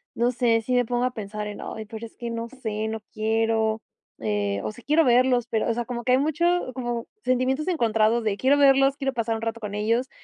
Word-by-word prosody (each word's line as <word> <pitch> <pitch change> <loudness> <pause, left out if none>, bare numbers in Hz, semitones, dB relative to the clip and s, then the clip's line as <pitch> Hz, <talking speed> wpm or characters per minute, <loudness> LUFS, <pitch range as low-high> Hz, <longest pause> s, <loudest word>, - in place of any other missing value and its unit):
no 240 +1 +2
sé 235 -2 +2
si 250 +3 -2
me 245 0 +3
pongo 245 +1 -1
a 250 - +1
pensar 210 -1 -5
en: 210 - -7
"Ay, 220 - -6
pero 225 +1 -7
es - - -25
que 235 -1 -5
no 230 0 -4
sé, 220 -4 -4
no 220 0 -4
quiero". 220 0 +1 0.4
Eh. 100 -2 -1
O, 110 - -2
si - - -14
quiero 310 +3 +4
verlos, 250 -1 +3
pero, 225 -2 0
o 230 - +2
sea, 240 +1 -3
como 240 -1 -5
que 250 - +1
hay 255 - +6
mucho, 310 +4 0 0.3
como, 240 -2 -3 0.2
sentimientos 255 +4 +1
encontrados 230 - +2
de 210 -2 0
quiero 265 +5 +4
verlos, 275 -1 +5
quiero 270 -2 -1
pasar 230 -2 -1
un 220 - -5
rato 225 0 -3
con 210 -2 -6
ellos, 230 +5 0
230 Hz, 235 wpm, -25 LUFS, 220-255 Hz, 0.4 s, hay